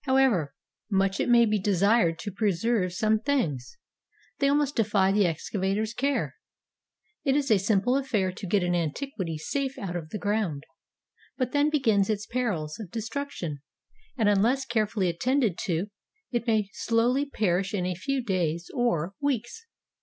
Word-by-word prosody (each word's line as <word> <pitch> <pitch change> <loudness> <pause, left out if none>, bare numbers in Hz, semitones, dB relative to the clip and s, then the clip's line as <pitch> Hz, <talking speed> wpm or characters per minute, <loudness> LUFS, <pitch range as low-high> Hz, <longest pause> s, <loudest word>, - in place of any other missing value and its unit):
However 260 - +2 0.3
much 195 -1 +1
it - - 0
may 235 -1 +6
be 215 -1 +1
desired 195 -2 +3
to 205 +3 -5
preserve 200 0 0
some 215 +4 +1
things, 210 - -1 0.6
they 275 - +3
almost 290 0 +1
defy 205 -3 +2
the 200 -2 +3
excavator's 195 +6 -2
care. 275 +3 -1 0.9
It 270 - +2
is 280 -4 +1
a 210 - +5
simple 210 +5 +2
affair 230 -9 0
to 190 +2 -7
get 195 +1 +2
an 175 0 0
antiquity 175 - -2
safe 270 - -3
out 180 -3 -5
of 165 -3 -5
the 210 - -4
ground, 205 -9 -1 0.7
but 255 -2 -1
then 290 +1 +3
begins 225 -10 +2
its 210 0 -1
perils 200 -12 -2
of 210 -6 -7
destruction, 225 - -4 0.6
and 220 -4 +2
unless 230 +7 +3
care 220 -3 +1
fully 200 -3 -1
attended 230 +4 +1
to, 185 +2 -1 0.4
it 240 -1 -2
may 215 -3 +2
slowly 245 +5 +1
perish 195 -5 0
in 190 -4 -1
a 180 - -1
few 260 +9 -2
days 175 -5 -1
or 200 - 0
weeks. 285 - -2
210 Hz, 160 wpm, -27 LUFS, 185-250 Hz, 0.9 s, may